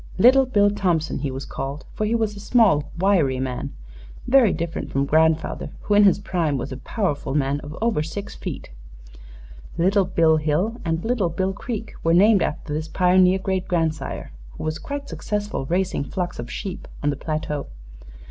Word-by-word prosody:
'Little 260 Hz, +6 st, +6 dB
Bill 205 Hz, -4 st, +3 dB
Thompson,' 175 Hz, -8 st, 0 dB
he 140 Hz, 0 st, -2 dB
was 135 Hz, +1 st, -5 dB
called, 140 Hz, +4 st, -5 dB
for 215 Hz, -, -1 dB
he 230 Hz, -, +1 dB
was 220 Hz, -2 st, 0 dB
a -, -, -9 dB
small, 200 Hz, -, +3 dB
wiry 170 Hz, -9 st, +2 dB
man 130 Hz, -1 st, -3 dB, 0.5 s
very 250 Hz, -6 st, +5 dB
different 165 Hz, 0 st, -3 dB
from 135 Hz, +1 st, 0 dB
grandfather, 160 Hz, +2 st, +1 dB
who 210 Hz, -, -1 dB
in 205 Hz, 0 st, +6 dB
his 195 Hz, -, +5 dB
prime 170 Hz, -7 st, -1 dB
was 125 Hz, -, -5 dB
a 130 Hz, -, -5 dB
powerful 145 Hz, -, -2 dB
man 140 Hz, 0 st, +1 dB
of 145 Hz, +1 st, -9 dB
over 230 Hz, -10 st, +2 dB
six 195 Hz, +6 st, -5 dB
feet. -, -, -7 dB, 1.1 s
Little 190 Hz, +3 st, +3 dB
Bill 165 Hz, -3 st, +3 dB
Hill 155 Hz, +10 st, 0 dB
and 165 Hz, 0 st, -2 dB
Little 225 Hz, -7 st, +1 dB
Bill 190 Hz, +3 st, -1 dB
Creek 220 Hz, +2 st, -5 dB
were 165 Hz, +1 st, +3 dB
named 200 Hz, +2 st, +5 dB
after 150 Hz, 0 st, -2 dB
this 155 Hz, +1 st, -3 dB
pioneer 185 Hz, +2 st, +4 dB
great 190 Hz, -1 st, -2 dB
grandsire, 160 Hz, -, -2 dB, 0.3 s
who -, -, -6 dB
was 155 Hz, 0 st, -2 dB
quite 285 Hz, 0 st, -5 dB
successful 205 Hz, -9 st, -3 dB
raising 180 Hz, -2 st, 0 dB
flocks 175 Hz, +2 st, -4 dB
of 120 Hz, 0 st, -5 dB
sheep 190 Hz, -, -6 dB, 0.2 s
on 145 Hz, -, +2 dB
the -, -, -3 dB
plateau. 150 Hz, -1 st, -3 dB
175 Hz, 175 wpm, -23 LUFS, 150-205 Hz, 1.1 s, Little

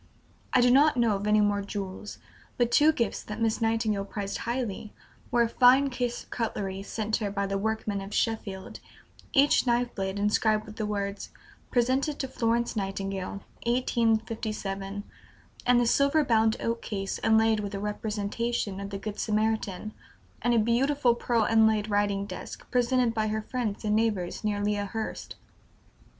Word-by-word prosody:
I 255 Hz, -, +4 dB
do 245 Hz, 0 st, +5 dB
not 285 Hz, +2 st, +5 dB
know 230 Hz, -3 st, +3 dB
of 200 Hz, +1 st, -3 dB
any 210 Hz, 0 st, +4 dB
more 205 Hz, -1 st, +2 dB
jewels; 200 Hz, 0 st, -6 dB, 0.4 s
but 240 Hz, -1 st, +2 dB
two 300 Hz, +4 st, +6 dB
gifts 235 Hz, -9 st, -1 dB
that 210 Hz, +1 st, -7 dB
Miss 225 Hz, 0 st, 0 dB
Nightingale 225 Hz, -3 st, +1 dB
prized 200 Hz, 0 st, -4 dB
highly 230 Hz, -4 st, -3 dB, 0.3 s
were 240 Hz, -1 st, +3 dB
a -, -, +1 dB
fine 255 Hz, +4 st, +5 dB
case 245 Hz, -1 st, -2 dB
of -, -, -27 dB
cutlery 195 Hz, -4 st, -3 dB
sent 215 Hz, +2 st, -2 dB
her 210 Hz, -3 st, -2 dB
by 200 Hz, 0 st, -1 dB
the 195 Hz, 0 st, -2 dB
workmen 215 Hz, -1 st, -2 dB
of 195 Hz, +1 st, -8 dB
Sheffield, 205 Hz, -5 st, -2 dB, 0.5 s
each 280 Hz, -2 st, +4 dB
knife 240 Hz, 0 st, +1 dB
blade 190 Hz, 0 st, -3 dB
inscribed 210 Hz, +1 st, +2 dB
with 215 Hz, 0 st, -11 dB
the 215 Hz, -, -2 dB
words 200 Hz, -1 st, -3 dB, 0.4 s
"Presented 260 Hz, +5 st, +1 dB
to 265 Hz, -, -3 dB
Florence 235 Hz, -2 st, 0 dB
Nightingale, 195 Hz, -1 st, -3 dB, 0.2 s
1857," 220 Hz, -4 st, -1 dB, 0.6 s
and 245 Hz, 0 st, +5 dB
the 245 Hz, -, +2 dB
silver 280 Hz, +5 st, +3 dB
bound 220 Hz, -2 st, +3 dB
oak 230 Hz, 0 st, -2 dB
case 195 Hz, -3 st, -4 dB
inlaid 220 Hz, 0 st, +4 dB
with 205 Hz, -1 st, -4 dB
a -, -, -3 dB
representation 210 Hz, 0 st, -2 dB
of 200 Hz, 0 st, -5 dB
the 200 Hz, -, -4 dB
Good 205 Hz, +1 st, -6 dB
Samaritan; 215 Hz, -1 st, -1 dB, 0.5 s
and 240 Hz, +1 st, +2 dB
a -, -, +4 dB
beautiful 245 Hz, +3 st, +3 dB
pearl 235 Hz, -1 st, +1 dB
inlaid 220 Hz, -1 st, +3 dB
writing 205 Hz, -1 st, +1 dB
desk, -, -, -8 dB
presented 245 Hz, -1 st, +2 dB
by 220 Hz, -1 st, 0 dB
her 215 Hz, 0 st, -2 dB
friends 225 Hz, -3 st, -3 dB
and 210 Hz, 0 st, +2 dB
neighbors 215 Hz, -6 st, 0 dB
near 205 Hz, -1 st, -1 dB
Lea 210 Hz, 0 st, +1 dB
Hurst. 215 Hz, +2 st, -5 dB
220 Hz, 165 wpm, -28 LUFS, 205-235 Hz, 0.6 s, two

